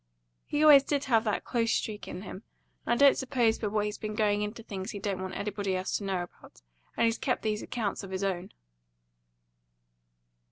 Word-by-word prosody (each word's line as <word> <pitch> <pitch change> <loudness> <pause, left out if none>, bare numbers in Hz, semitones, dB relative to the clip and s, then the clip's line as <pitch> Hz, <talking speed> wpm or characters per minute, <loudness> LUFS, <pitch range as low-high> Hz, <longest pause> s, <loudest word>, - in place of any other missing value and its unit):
He 295 +1 0
always 295 -3 +9
did 280 0 -1
have 230 -5 +3
that 210 - 0
close 230 -2 0
streak 210 -1 -2
in 185 - -6
him, 190 0 -8 0.5
and - - +3
I 285 - +7
don't 280 - +7
suppose 245 -4 +1
but 210 -2 -2
what 210 -1 +1
he's 210 0 -4
been 215 -1 -4
going 210 -1 +2
into 210 +2 -4
things 195 -1 -6
he 210 - -5
don't 195 -2 -3
want 185 0 -5
anybody 200 -2 -2
else 185 0 -2
to - - -8
know 190 -2 -1
about, 175 - -15 0.3
and - - +3
he's 230 0 +1
kept 250 - -1
these 215 -1 -1
accounts 220 -5 -3
of 195 - -8
his 190 +1 -3
own." 185 -2 -2
210 Hz, 205 wpm, -29 LUFS, 195-235 Hz, 0.5 s, always